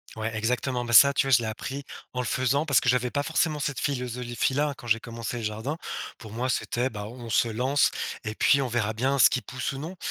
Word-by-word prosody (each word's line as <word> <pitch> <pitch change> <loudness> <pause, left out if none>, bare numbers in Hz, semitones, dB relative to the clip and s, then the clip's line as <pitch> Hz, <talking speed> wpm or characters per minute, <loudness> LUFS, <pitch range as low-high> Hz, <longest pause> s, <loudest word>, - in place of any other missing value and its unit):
Ouais 110 0 -3
exactement. 125 +3 -1
Bah, 120 - -3
ça, 140 +4 +9
tu 135 - +1
vois, 135 - 0
je 120 - +7
l'ai 115 - -3
appris 135 +5 -5 0.3
en 125 - -1
le - - -4
faisant 130 +5 +1
parce 140 -5 +4
que - - -4
j'avais 125 0 +2
pas 145 - 0
forcément 155 0 0
cette 145 -1 -2
philosophie-là 125 +2 -1
quand 120 - -11
j'ai 115 0 +2
commencé 115 0 -5
le 115 - -6
jardin. 110 +8 -3 0.4
Pour 110 -2 -11
moi, 120 +3 -2
c'était, 125 0 0
bah, 105 -4 -6
bon 120 +3 -9
on - - -7
se 115 +1 +2
lance 130 +5 +2 0.3
et 110 - -3
puis 140 +5 +3
on 130 - -1
verra 110 -2 0
bien 135 +5 0
ce - - +8
qui 125 - -1
pousse 130 +1 -4
ou - - -6
non. 165 +6 -7
125 Hz, 250 wpm, -26 LUFS, 115-140 Hz, 0.4 s, ça